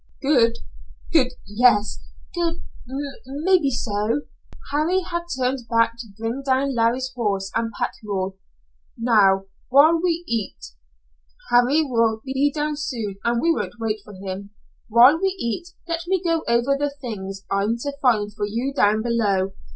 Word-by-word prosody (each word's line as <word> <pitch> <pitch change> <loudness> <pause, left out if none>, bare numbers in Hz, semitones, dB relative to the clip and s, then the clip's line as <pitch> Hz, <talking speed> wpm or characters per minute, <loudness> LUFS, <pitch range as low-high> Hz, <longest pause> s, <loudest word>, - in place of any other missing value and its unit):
"Good 240 -5 +3 0.6
good 260 -6 +4
yes. 210 0 +2 0.3
Good, 340 -2 -2 0.6
maybe 305 +3 +2
so." 225 +1 -1 0.5
Harry 320 +6 +2
had 345 -1 -4
turned 255 -1 -1
back 230 0 +3
to 230 - -7
bring 225 +4 -3
down 270 +1 +1
Larry's 245 +2 +1
horse 200 -5 -1
and 230 -1 -1
pack - - -1
mule. 195 -2 -3 0.6
"Now, 205 -5 +4 0.3
while 310 +5 +6
we 345 -1 0
eat, 220 - -4 0.8
Harry 245 +6 +4
will 230 -5 +1
be 270 +2 +1
down 300 0 -2
soon, 230 -9 -4 0.2
we 335 +6 +3
won't 240 - -4
wait 220 -1 -1
for 210 - -12
him, 190 +1 -6 0.4
while 245 +8 +7
we 385 0 +1
eat, 235 +8 -3 0.2
let 335 0 -2
me 380 +1 +2
go 330 -2 0
over 235 +4 +2
the 290 +1 0
things 195 -6 -6
I'm 200 +4 +1
to 285 -1 -3
find 210 -5 +2
for 205 -1 -2
you 240 +6 -2
down 215 -3 +3
below. 205 -5 +1
240 Hz, 145 wpm, -23 LUFS, 215-290 Hz, 0.8 s, while